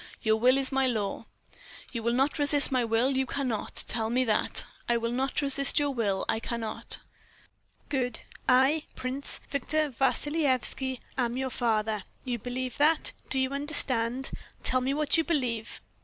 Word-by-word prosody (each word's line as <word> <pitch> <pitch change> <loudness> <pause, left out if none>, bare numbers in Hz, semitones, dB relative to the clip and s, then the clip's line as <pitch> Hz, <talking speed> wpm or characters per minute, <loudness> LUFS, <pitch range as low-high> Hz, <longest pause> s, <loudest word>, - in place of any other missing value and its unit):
"Your 220 0 +3
will 250 +4 +4
is 270 0 -1
my 270 -1 +2
law." 220 -2 -3 0.6
"You 230 - -4
will 235 +1 0
not 270 +5 +1
resist 290 -1 +5
my 255 -2 +2
will, 230 +3 +1
you 265 0 0
cannot. 255 -7 -1
Tell 220 -1 0
me 250 +2 +2
that." 220 -4 +2 0.2
"I 235 - +3
will 230 0 -2
not 265 +4 -1
resist 275 0 +3
your 290 -1 +2
will, 205 -7 -1
I 220 - 0
cannot." 225 -1 -2 0.9
"Good. 255 -3 -2 0.3
I, 265 +5 +3
Prince 260 +2 0
Victor 295 +2 -1
Vassilyevski, 265 -1 +1 0.2
am 240 0 0
your 260 0 -2
father. 220 -3 0 0.2
You 245 -2 -2
believe 250 +2 -5
that. 305 +2 +3 0.2
Do 265 - +3
you 260 0 0
understand? 265 -4 +2 0.3
Tell 255 0 +2
me 270 +2 -1
what 300 +2 +2
you 325 - +3
believe." 250 -9 -2
255 Hz, 160 wpm, -28 LUFS, 235-275 Hz, 0.9 s, resist